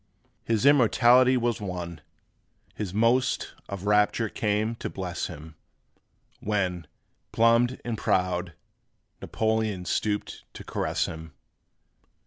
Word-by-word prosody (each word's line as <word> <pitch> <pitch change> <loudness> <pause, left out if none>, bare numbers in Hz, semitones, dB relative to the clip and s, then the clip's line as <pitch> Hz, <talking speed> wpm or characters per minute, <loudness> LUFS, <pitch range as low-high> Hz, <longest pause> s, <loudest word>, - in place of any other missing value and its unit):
His 115 +1 0
immortality 130 -1 +5
was 120 -3 -1
won, 90 -4 -5 0.7
His 105 -4 -5
most 115 +5 +1 0.2
of 100 -1 -6
rapture 105 +2 +2
came 105 +2 -1
to - - -5
bless 90 -2 -4
him, 80 -1 -10 0.9
When, 90 -5 -2 0.4
plumed 115 +2 +3
and 115 -2 -3
proud, 90 -2 0 0.7
Napoleon 110 -4 -1
Stooped 105 +4 -2
to - - -8
caress - - -1
him. 80 -1 -8
105 Hz, 105 wpm, -26 LUFS, 90-115 Hz, 0.9 s, immortality